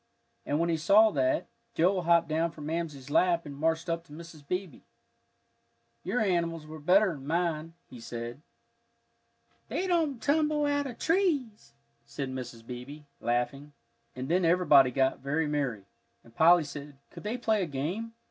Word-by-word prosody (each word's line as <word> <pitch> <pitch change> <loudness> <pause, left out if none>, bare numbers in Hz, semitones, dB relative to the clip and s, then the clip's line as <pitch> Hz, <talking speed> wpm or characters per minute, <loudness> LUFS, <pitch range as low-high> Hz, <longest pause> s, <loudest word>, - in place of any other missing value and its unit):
And 145 - 0
when 170 +1 +1
he 165 - +1
saw 205 +7 +5
that, 135 +2 +1 0.3
Joel 185 +3 +2
hopped 170 -1 +3
down 160 +2 0
from 155 -2 -10
Mamsie's 150 -4 -4
lap 170 +1 +3
and 145 -1 -8
marched 160 +3 0
up 165 0 -2
to - - -20
Mrs. 155 -2 -11
Beebe. 180 -4 -4 1.2
"Your 195 +8 -1
animals 170 -5 0
were 155 0 -9
better'n 180 -3 +2
mine," 165 -1 -1
he 125 - -12
said. 120 +3 -7 1.3
"They 370 - -2
don't 325 -8 +1
tumble 300 +1 +1
out 285 -1 0
of 245 - -8
trees," 320 - 0 0.3
said 135 +2 -5
Mrs. 125 -3 -7
Beebe, 125 +5 -8 0.2
laughing. 135 +5 -2 0.4
And 130 +1 -5
then 180 +4 +2
everybody 165 -6 +5
got 130 +1 +1
very 150 +4 -1
merry, 135 -9 -2 0.4
and 115 - -19
Polly 170 +5 +6
said, 145 -1 -9
Could - - -10
they 215 +4 -3
play 220 -3 +1
a 180 - -1
game? 175 +12 -4
165 Hz, 155 wpm, -29 LUFS, 140-190 Hz, 1.3 s, Polly